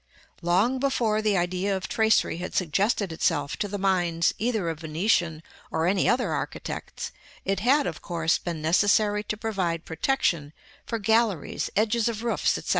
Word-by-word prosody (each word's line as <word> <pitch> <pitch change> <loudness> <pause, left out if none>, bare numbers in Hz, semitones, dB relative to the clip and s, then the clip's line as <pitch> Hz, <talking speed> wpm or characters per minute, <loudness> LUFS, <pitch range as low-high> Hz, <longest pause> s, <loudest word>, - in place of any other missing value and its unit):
Long 195 +10 +2
before 235 -6 +1
the 210 -2 +2
idea 185 +3 0
of 180 -4 -5
tracery 220 -6 +2
had 180 +1 -6
suggested 195 +3 +1
itself 150 -3 0
to 205 - -1
the 205 +1 -4
minds 175 -4 +1
either 220 -5 0
of 165 -2 -3
Venetian 165 0 0 0.3
or 160 - 0
any 190 +2 +2
other 240 -7 +1
architects, 145 -1 -5 0.3
it 195 0 0
had, 275 +7 +3
of - - -4
course, 165 -2 0
been 165 -3 -5
necessary 205 +5 +3
to 215 - -3
provide 185 -7 -2
protection 160 - 0 0.3
for 230 - -1
galleries, 220 -4 +1
edges 225 +2 +2
of 225 0 -5
roofs, 235 - +1
&c. - - -4
195 Hz, 160 wpm, -26 LUFS, 165-220 Hz, 0.3 s, had